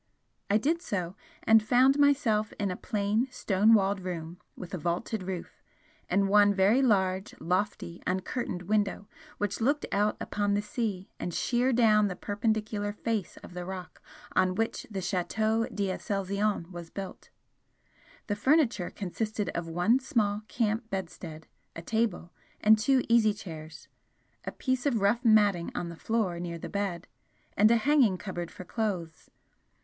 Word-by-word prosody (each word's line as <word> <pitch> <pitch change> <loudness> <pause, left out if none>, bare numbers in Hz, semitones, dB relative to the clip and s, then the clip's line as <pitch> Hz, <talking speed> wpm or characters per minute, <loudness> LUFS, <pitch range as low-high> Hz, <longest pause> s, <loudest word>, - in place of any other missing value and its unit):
I 205 - +4
did 320 +9 0
so, 185 - -3 0.3
and 225 0 +6
found 255 +6 +4
myself 265 -7 +3
in 200 -2 -2
a - - -3
plain 210 +5 0
stone 220 -2 +3
walled 200 -1 +2
room 175 -2 -6 0.2
with 180 - -9
a 185 - -3
vaulted 175 +6 -2
roof, 185 -1 -6 0.5
and 195 +2 +2
one 205 0 +5
very 200 +7 +4
large, 190 -5 +1
lofty, 180 0 -2
uncurtained 185 0 -2
window 205 +1 0 0.3
which 205 +1 -2
looked 285 +6 +1
out 210 +1 +1
upon 205 -1 -1
the 205 - +1
sea 210 -4 -3
and 175 - -3
sheer 250 +1 +1
down 215 -3 +4
the 185 - -4
perpendicular 210 0 -1
face 210 -2 -3
of - - -11
the 180 0 -5
rock 185 -1 -8 0.3
on 185 0 +3
which 225 +3 -2
the 195 -3 -4
Chateau 215 +5 0
d'Aselzion 200 -1 -2
was 170 -2 -8
built. 195 +1 -8 1.0
The 205 - -1
furniture 245 - +2
consisted 210 +2 -3
of 170 0 -4
one 175 +10 +2
small 215 -7 0
camp 225 +2 -1
bedstead, 170 -4 -6 0.3
a 165 - -7
table, 220 -6 -1 0.3
and 215 0 +5
two 265 +3 +3
easy 225 -3 +4
chairs, 160 -6 -9 0.6
a - - -3
piece 260 0 -1
of 240 -6 +1
rough 205 +5 +2
matting 205 -6 +4
on 170 - -3
the 170 - -8
floor 200 -3 -1
near 170 -1 -4
the - - -7
bed, 195 -4 -3 0.5
and 215 +2 +5
a 235 - +5
hanging 255 -6 +3
cupboard 175 -3 -5
for - - -10
clothes. 180 -5 -4
205 Hz, 155 wpm, -29 LUFS, 185-225 Hz, 1.0 s, and